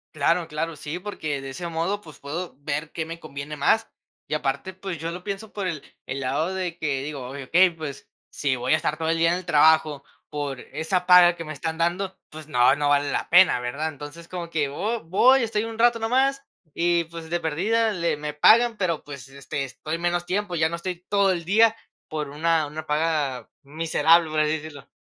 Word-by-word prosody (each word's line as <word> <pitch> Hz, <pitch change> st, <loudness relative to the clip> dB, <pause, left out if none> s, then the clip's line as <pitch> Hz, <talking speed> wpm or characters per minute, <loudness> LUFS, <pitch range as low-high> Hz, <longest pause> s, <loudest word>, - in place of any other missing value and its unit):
Claro, 165 Hz, +3 st, +1 dB
claro, 160 Hz, 0 st, -4 dB
sí, 155 Hz, +3 st, -5 dB
porque 155 Hz, -8 st, -4 dB
de 135 Hz, -, -7 dB
ese 170 Hz, +6 st, -5 dB
modo, 170 Hz, +5 st, -1 dB
pues, 155 Hz, -7 st, -14 dB
puedo 165 Hz, +3 st, -5 dB
ver 150 Hz, +2 st, -3 dB
qué 160 Hz, -, -3 dB
me 165 Hz, +1 st, -7 dB
conviene 150 Hz, 0 st, -7 dB
más. 220 Hz, +10 st, +2 dB, 0.4 s
Y -, -, -2 dB
aparte, 150 Hz, +5 st, -2 dB
pues, 185 Hz, -2 st, -6 dB
yo 165 Hz, +2 st, -4 dB
lo 180 Hz, +2 st, -8 dB
pienso 200 Hz, +2 st, -5 dB
por 200 Hz, -3 st, -3 dB
el 155 Hz, -5 st, -4 dB, 0.2 s
el 135 Hz, +1 st, -4 dB
lado 155 Hz, +8 st, -1 dB
de 180 Hz, -3 st, -3 dB
que 140 Hz, -4 st, -2 dB
digo: 140 Hz, -4 st, -6 dB
"Okey, 165 Hz, +7 st, +3 dB
pues, 155 Hz, -4 st, -8 dB, 0.2 s
si 140 Hz, -3 st, 0 dB
voy 125 Hz, +1 st, -2 dB
a 155 Hz, -, +5 dB
estar 155 Hz, -1 st, -1 dB
todo 160 Hz, 0 st, -2 dB
el 165 Hz, -, +1 dB
día 165 Hz, +1 st, +3 dB
en 180 Hz, -, -1 dB
el 185 Hz, -, -11 dB
trabajo 155 Hz, -3 st, +4 dB, 0.2 s
por 145 Hz, -4 st, -4 dB
esa 180 Hz, +4 st, -2 dB
paga 180 Hz, -1 st, +7 dB
que 165 Hz, -, -6 dB
me 155 Hz, -, -7 dB
están 160 Hz, +2 st, -4 dB
dando, 180 Hz, +3 st, -1 dB
pues, 155 Hz, 0 st, -10 dB
no, 125 Hz, 0 st, +4 dB
no 145 Hz, -1 st, 0 dB
vale 145 Hz, 0 st, +2 dB
la -, -, -2 dB
pena", 175 Hz, -7 st, +6 dB
¿verdad? 140 Hz, +6 st, -3 dB
Entonces 145 Hz, +3 st, -10 dB
como 175 Hz, -2 st, -5 dB
que 150 Hz, -4 st, 0 dB
vo 210 Hz, +9 st, -3 dB
voy, 245 Hz, +10 st, +4 dB
estoy 220 Hz, -1 st, -1 dB
un 225 Hz, 0 st, -7 dB
rato 235 Hz, 0 st, +4 dB
nomás 265 Hz, +4 st, +1 dB, 0.3 s
y, 170 Hz, 0 st, +2 dB
pues, 165 Hz, -1 st, -9 dB
de 175 Hz, 0 st, -1 dB
perdida 215 Hz, +9 st, +1 dB
le 170 Hz, -5 st, 0 dB
me 150 Hz, 0 st, -5 dB
pagan, 225 Hz, +8 st, +5 dB
pero, 170 Hz, -5 st, -1 dB
pues, 140 Hz, -2 st, -9 dB
este, 140 Hz, 0 st, -5 dB
estoy 155 Hz, +5 st, -5 dB
menos 175 Hz, 0 st, -1 dB
tiempo, 195 Hz, -1 st, -2 dB
ya 160 Hz, -1 st, +2 dB
no 170 Hz, -, -4 dB
estoy 180 Hz, 0 st, -5 dB
todo 200 Hz, -2 st, +3 dB
el 170 Hz, -1 st, -4 dB
día 220 Hz, +5 st, +4 dB, 0.3 s
por 150 Hz, -2 st, -4 dB
una 160 Hz, +1 st, +1 dB
una 155 Hz, +2 st, -7 dB
paga 150 Hz, -4 st, -1 dB
miserable, 165 Hz, +2 st, +3 dB
por 155 Hz, 0 st, -1 dB
así 155 Hz, 0 st, +2 dB
decirlo. 145 Hz, -2 st, -11 dB
165 Hz, 215 wpm, -24 LUFS, 150-180 Hz, 0.4 s, paga